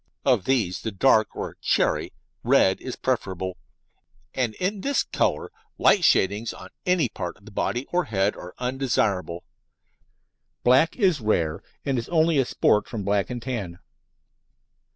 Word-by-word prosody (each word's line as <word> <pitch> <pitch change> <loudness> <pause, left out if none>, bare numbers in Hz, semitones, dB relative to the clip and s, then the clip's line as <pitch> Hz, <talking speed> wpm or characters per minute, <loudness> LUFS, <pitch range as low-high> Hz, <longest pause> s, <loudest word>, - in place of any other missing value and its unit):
Of 125 -8 +3
these 115 -9 0
the 110 - -3
dark, 110 +1 +3
or - - -5
cherry, - - +1 0.3
red 95 - +3
is 130 - -5
preferable, 95 -7 -2 0.8
and 120 -4 -1
in 195 +2 -2
this 280 +4 +1
colour - - -1 0.3
light 195 - +4
shadings 105 - +2
on - - -11 0.2
any 180 -3 +3
part 90 -3 -6
of 100 - -23
the 110 - -12
body 120 +5 -2
or 175 -1 +1
head 100 -4 0
are 90 - -10
undesirable. 120 -9 -1 1.2
"Black" 130 +6 +4
is 185 - +2
rare, 85 -8 0 0.2
and 135 -3 0
is 115 - -7
only 160 -3 +3
a 135 - +3
sport 105 - +2
from 110 -4 -5
black 100 0 0
and 120 -2 -5
tan. 100 -10 -4
115 Hz, 150 wpm, -25 LUFS, 100-135 Hz, 1.2 s, light